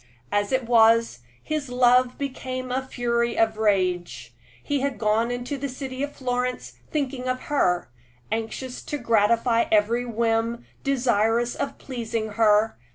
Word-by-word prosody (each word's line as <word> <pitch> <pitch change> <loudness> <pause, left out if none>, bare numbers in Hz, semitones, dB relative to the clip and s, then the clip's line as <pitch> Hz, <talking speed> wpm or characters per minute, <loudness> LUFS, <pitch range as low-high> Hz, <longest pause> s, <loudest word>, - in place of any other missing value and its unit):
As 205 0 0
it 260 -1 +1
was, 230 - +4 0.2
his 305 -3 -3
love 250 0 +3
became 255 -2 -4
a 260 +1 0
fury 235 -2 -1
of 220 -1 +2
rage. 180 - 0 0.3
He 285 - 0
had 275 -1 -2
gone 220 +2 +1
into 245 +3 -4
the 280 +1 -3
city 260 0 -6
of 285 0 -2
Florence, 250 -1 -2 0.2
thinking 270 -4 -2
of 255 0 -1
her, 180 - +2 0.4
anxious 225 +3 -4
to 295 - -3
gratify 230 0 +2
every 220 +3 +3
whim, 230 0 0 0.2
desirous 240 -3 +1
of 280 - -4
pleasing 230 -4 -4
her. 215 - +3
235 Hz, 140 wpm, -24 LUFS, 220-255 Hz, 0.4 s, was